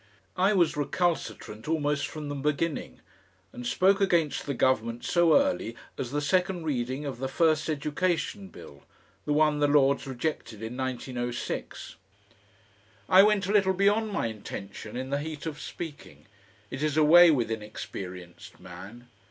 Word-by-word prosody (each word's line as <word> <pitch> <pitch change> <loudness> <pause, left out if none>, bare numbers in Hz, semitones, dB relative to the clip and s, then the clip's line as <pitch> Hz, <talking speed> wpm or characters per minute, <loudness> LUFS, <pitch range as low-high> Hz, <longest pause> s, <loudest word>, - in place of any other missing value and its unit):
I 190 +3 +3
was 175 -5 +2
recalcitrant 145 - -2
almost 150 -2 0
from 155 -2 -7
the 145 - -4
beginning, 150 +3 -2 0.5
and 245 -1 -6
spoke 195 -2 +3
against 170 -8 +1
the 140 - -2
Government 120 -2 0
so 175 - +4
early 280 - -1 0.2
as 125 - -4
the 145 +3 -2
second 180 +2 0
reading 130 -1 -2
of 130 -4 -5
the 135 - -2
first 155 +2 +1
Education 170 +6 -1
Bill, 70 - -13 0.4
the 150 - 0
one 150 0 +3
the 145 - +3
Lords 140 -1 +3
rejected 120 -5 -4
in 115 +2 -5
1906. 125 -2 -4 1.1
I 185 +1 +8
went 210 -1 +3
a 195 - -1
little 195 -2 +3
beyond 205 +3 +2
my 200 - -1
intention 105 0 -7
in 130 +1 -5
the 140 - 0
heat 150 0 -6
of 150 -2 -5
speaking, 160 -4 -8 0.5
it 135 - -5
is 155 -1 0
a 155 - +5
way 175 +3 +8
with 125 -7 +1
inexperienced 95 -5 -8
man. 95 +7 -11
145 Hz, 150 wpm, -27 LUFS, 120-175 Hz, 1.1 s, I